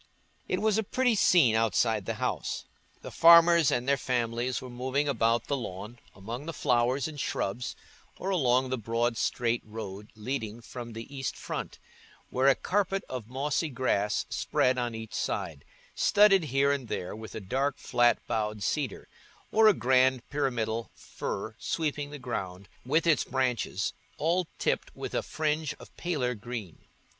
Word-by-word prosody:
It -, -, -1 dB
was 220 Hz, -1 st, +3 dB
a -, -, 0 dB
pretty 250 Hz, +3 st, +1 dB
scene 175 Hz, -, +5 dB
outside 110 Hz, -3 st, +1 dB
the -, -, -1 dB
house: -, -, -2 dB, 0.4 s
the -, -, -7 dB
farmers 170 Hz, -1 st, +7 dB
and 120 Hz, +2 st, 0 dB
their 140 Hz, 0 st, +3 dB
families 120 Hz, 0 st, -1 dB
were 130 Hz, -, -8 dB
moving 130 Hz, +4 st, -1 dB
about 115 Hz, -3 st, +2 dB
the 140 Hz, -, -1 dB
lawn, 105 Hz, -1 st, -6 dB, 0.2 s
among 115 Hz, +9 st, -7 dB
the 165 Hz, -, -3 dB
flowers 125 Hz, +3 st, +2 dB
and 150 Hz, -2 st, -8 dB
shrubs, 120 Hz, -1 st, -2 dB, 0.4 s
or 190 Hz, -, -3 dB
along 130 Hz, -6 st, +2 dB
the 130 Hz, -, -1 dB
broad 115 Hz, +2 st, 0 dB
straight 120 Hz, +1 st, 0 dB
road 105 Hz, -1 st, -8 dB
leading 110 Hz, -1 st, -4 dB
from 120 Hz, 0 st, -8 dB
the 115 Hz, +1 st, -6 dB
east 135 Hz, -1 st, -3 dB
front, -, -, -5 dB, 0.5 s
where 130 Hz, +2 st, +2 dB
a 135 Hz, -, +6 dB
carpet 195 Hz, 0 st, 0 dB
of 125 Hz, -4 st, -5 dB
mossy 145 Hz, +5 st, -1 dB
grass 115 Hz, -6 st, 0 dB
spread 130 Hz, 0 st, +1 dB
on 120 Hz, -2 st, -2 dB
each 110 Hz, -1 st, -8 dB
side, 70 Hz, -3 st, -3 dB, 0.3 s
studded 195 Hz, -4 st, +5 dB
here 140 Hz, 0 st, +2 dB
and 140 Hz, -4 st, -2 dB
there 90 Hz, -2 st, -4 dB
with 110 Hz, 0 st, -9 dB
a -, -, -3 dB
dark 135 Hz, +8 st, -1 dB
flat 120 Hz, 0 st, +3 dB
boughed 105 Hz, -2 st, -2 dB
cedar, 140 Hz, -4 st, -2 dB, 0.4 s
or 220 Hz, 0 st, +6 dB
a 215 Hz, -, +7 dB
grand 130 Hz, 0 st, +3 dB
pyramidal 115 Hz, -6 st, -1 dB
fir 110 Hz, +3 st, -5 dB
sweeping 150 Hz, -3 st, -2 dB
the 145 Hz, -, -7 dB
ground 100 Hz, -7 st, -5 dB, 0.2 s
with 155 Hz, +7 st, +1 dB
its 155 Hz, -5 st, +4 dB
branches, 125 Hz, -7 st, -1 dB, 0.2 s
all 170 Hz, +3 st, +1 dB
tipped -, -, -1 dB
with -, -, -6 dB
a -, -, +1 dB
fringe 155 Hz, 0 st, -1 dB
of -, -, -15 dB
paler 145 Hz, -8 st, -1 dB
green. 115 Hz, -5 st, -7 dB
125 Hz, 160 wpm, -29 LUFS, 115-145 Hz, 0.5 s, farmers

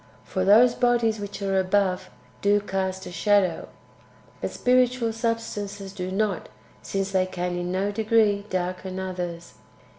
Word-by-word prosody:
For 185 Hz, -, -2 dB
those 225 Hz, +5 st, +6 dB
bodies 240 Hz, -3 st, +2 dB
which 205 Hz, 0 st, -6 dB
are 195 Hz, -1 st, +2 dB
above 190 Hz, 0 st, +1 dB, 0.3 s
do 205 Hz, +1 st, +4 dB
cast 190 Hz, -1 st, -3 dB
a -, -, -7 dB
shadow, 185 Hz, -1 st, +2 dB, 0.7 s
but -, -, -1 dB
spiritual 250 Hz, -2 st, +2 dB
substances 210 Hz, -4 st, -3 dB
do 185 Hz, -2 st, -4 dB
not, 200 Hz, -1 st, -1 dB, 0.3 s
since 195 Hz, 0 st, -2 dB
they 185 Hz, -1 st, +2 dB
can 180 Hz, -1 st, -3 dB
in 175 Hz, 0 st, -3 dB
no 195 Hz, +2 st, 0 dB
degree 215 Hz, -1 st, +2 dB
darken 185 Hz, +1 st, -3 dB
others. 180 Hz, -2 st, -5 dB
195 Hz, 140 wpm, -25 LUFS, 185-215 Hz, 0.7 s, those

